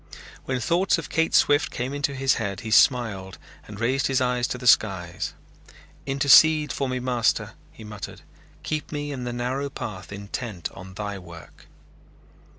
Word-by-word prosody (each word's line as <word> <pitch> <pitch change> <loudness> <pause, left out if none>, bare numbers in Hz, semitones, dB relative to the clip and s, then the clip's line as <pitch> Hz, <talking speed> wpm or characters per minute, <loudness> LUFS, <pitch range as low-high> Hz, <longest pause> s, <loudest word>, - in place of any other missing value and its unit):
When 130 -1 -1
thoughts 175 +8 +2
of 160 -3 -6
Kate 165 0 +1
Swift 145 +1 +4
came 125 +3 -4
into 140 -1 -2
his 135 -1 +2
head, 100 -2 -3
he 110 - -6
smiled 105 -7 +3 0.3
and 105 -1 -9
raised 130 +3 +1
his 135 -1 +1
eyes 125 -1 +1
to - - -4
the 125 - -9
skies. 95 -7 +2 0.7
"Intercede 150 +3 +5
for 135 -2 -2
me, 130 0 -2
Master," 125 -2 0 0.2
he 110 - -13
muttered, 105 -3 -8 0.4
"keep 155 -1 -3
me 145 -1 -4
in 130 -3 -5
the 120 - -3
narrow 125 +4 -2
path 100 -8 -7
intent 100 -1 -5
on 95 0 -11
Thy 100 -1 -4
work." 85 -4 -14
125 Hz, 160 wpm, -25 LUFS, 100-140 Hz, 0.7 s, Intercede